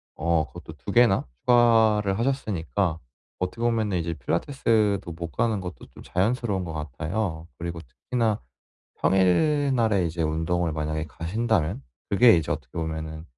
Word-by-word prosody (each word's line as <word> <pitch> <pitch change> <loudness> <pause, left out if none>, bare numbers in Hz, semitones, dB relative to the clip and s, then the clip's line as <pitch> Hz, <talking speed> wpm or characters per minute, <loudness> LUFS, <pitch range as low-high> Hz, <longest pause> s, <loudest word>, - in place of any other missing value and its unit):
어 80 -1 +1
그것도 - - -11
2 - - -6
개나 120 -5 +4 0.2
추가를 110 -4 +4
하셨으니까 100 - -1 0.4
어떻게 90 +5 -3
보면은 110 -5 +1
이제 85 -1 -2
필라테스도 100 - 0
못 85 0 -6
가는 115 -3 0
것도 90 -1 -8
좀 - - -12
자연스러운 100 0 0
것 85 -2 -6
같아요. 80 - -3
그리고 85 0 -5
특히나 110 - -2 0.6
평일날에 110 - +3
이제 85 +1 -3
운동을 80 +2 0
만약에 75 0 -2
가신다면 95 - -1 0.3
그게 115 0 +6
이제 80 - -2
어떻게 60 - -4
보면은 80 -1 -4
95 Hz, 330 characters per minute, -25 LUFS, 80-115 Hz, 0.6 s, 그게